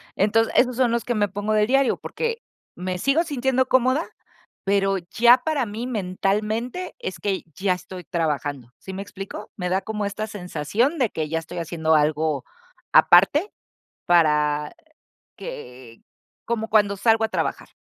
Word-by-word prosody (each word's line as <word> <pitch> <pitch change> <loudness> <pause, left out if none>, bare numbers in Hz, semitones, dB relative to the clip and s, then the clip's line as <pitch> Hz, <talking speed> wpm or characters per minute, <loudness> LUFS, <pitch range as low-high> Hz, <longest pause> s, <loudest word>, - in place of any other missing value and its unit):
Enton 220 +3 +3
esos 250 -1 +3
son 250 -3 +3
los 235 0 0
que 240 - -1
me 205 -1 +2
pongo 205 +2 -2
de 210 0 +4
diario, 270 +1 +3
porque 470 0 -4 0.3
me 180 0 -3
sigo 280 - +2
sintiendo 260 -4 0
cómoda, 260 +5 +2 0.6
pero 195 0 +2
ya 240 +3 +6
para 295 -6 +1
mí 225 +4 -5
mentalmente 215 - -2
es 475 - -5
que 195 -2 -2
ya 190 -1 +1
estoy 180 0 -9
trabajando, 145 -6 -2
¿sí 190 - -9
me 195 - -5
explico?, 200 +1 -8
me 180 -1 -2
da 190 +1 +1
como 210 -2 -3
esta 200 +2 -3
sensación 205 - -1
de 240 -5 +2
que 155 -2 -4
ya 165 0 0
estoy 170 +2 -7
haciendo 160 -1 0
algo 150 -2 +1 0.5
aparte, 285 - +5 0.6
para 150 -3 +2 0.6
que 125 -2 -9 0.4
como 225 -1 -2
cuando 205 -2 +3
salgo 225 +1 +3
a - - -5
trabajar. - - -3
205 Hz, 155 wpm, -23 LUFS, 175-240 Hz, 0.6 s, ya